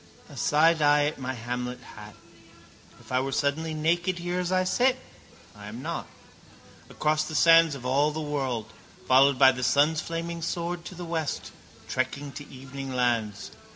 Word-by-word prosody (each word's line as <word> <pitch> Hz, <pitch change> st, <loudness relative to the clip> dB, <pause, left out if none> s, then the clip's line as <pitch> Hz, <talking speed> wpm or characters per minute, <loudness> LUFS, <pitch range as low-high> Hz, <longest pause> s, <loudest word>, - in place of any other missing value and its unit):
A -, -, -12 dB
side 160 Hz, +2 st, +3 dB
eye 145 Hz, 0 st, +4 dB
at 150 Hz, 0 st, -3 dB
my 130 Hz, 0 st, -3 dB
Hamlet 125 Hz, +1 st, -4 dB, 0.2 s
hat. 105 Hz, -1 st, -11 dB, 0.8 s
If -, -, -16 dB
I 130 Hz, -, +2 dB
were 135 Hz, +1 st, -2 dB
suddenly 155 Hz, +4 st, -1 dB
naked 170 Hz, +4 st, 0 dB
here 175 Hz, +1 st, -3 dB
as 180 Hz, 0 st, -2 dB
I 185 Hz, 0 st, +2 dB
sit? 250 Hz, +7 st, +2 dB, 0.6 s
I -, -, -11 dB
am -, -, -8 dB
not. -, -, -4 dB, 0.8 s
Across 155 Hz, 0 st, 0 dB
the 155 Hz, -, -6 dB
sands 165 Hz, -1 st, +6 dB
of 125 Hz, -2 st, -9 dB
all 140 Hz, +4 st, +2 dB
the 155 Hz, +1 st, -5 dB
world, 135 Hz, -7 st, -3 dB, 0.3 s
followed 135 Hz, +1 st, +5 dB
by 135 Hz, 0 st, +7 dB
the 130 Hz, -1 st, -6 dB
sun's 150 Hz, +5 st, +3 dB
flaming 170 Hz, 0 st, -4 dB
sword, 170 Hz, +1 st, -3 dB
to 185 Hz, -, -8 dB
the 175 Hz, 0 st, -7 dB
west, 165 Hz, -3 st, -3 dB, 0.4 s
trekking 130 Hz, +4 st, -2 dB
to 145 Hz, +1 st, -10 dB
evening 135 Hz, +1 st, -8 dB
lands. 115 Hz, -5 st, -1 dB
145 Hz, 170 wpm, -27 LUFS, 130-165 Hz, 0.8 s, by